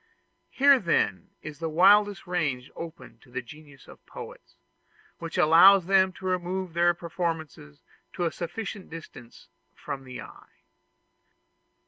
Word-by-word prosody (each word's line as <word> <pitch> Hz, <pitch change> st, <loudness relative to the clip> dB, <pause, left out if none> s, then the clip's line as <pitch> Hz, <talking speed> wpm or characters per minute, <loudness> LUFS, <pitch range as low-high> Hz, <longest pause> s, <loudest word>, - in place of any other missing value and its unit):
Here 275 Hz, 0 st, +5 dB
then 170 Hz, -6 st, 0 dB
is 155 Hz, -1 st, -9 dB
the 165 Hz, -1 st, -3 dB
wildest 200 Hz, +4 st, +4 dB
range 150 Hz, -8 st, -2 dB
open 165 Hz, -1 st, -10 dB
to 125 Hz, -, -22 dB
the 130 Hz, +1 st, -5 dB
genius 145 Hz, 0 st, -15 dB
of -, -, -15 dB
poets, -, -, -11 dB, 0.6 s
which 165 Hz, -1 st, -6 dB
allows 175 Hz, +4 st, +7 dB
them 190 Hz, 0 st, +3 dB
to 190 Hz, -, -12 dB
remove 185 Hz, -1 st, -2 dB
their 175 Hz, +1 st, +3 dB
performances 165 Hz, -, -5 dB, 0.3 s
to 175 Hz, -, -2 dB
a 165 Hz, -, 0 dB
sufficient 200 Hz, +3 st, -6 dB
distance 135 Hz, -, -12 dB, 0.3 s
from 140 Hz, -2 st, -7 dB
the 125 Hz, -1 st, -9 dB
eye. -, -, -15 dB
170 Hz, 130 wpm, -26 LUFS, 150-185 Hz, 0.6 s, allows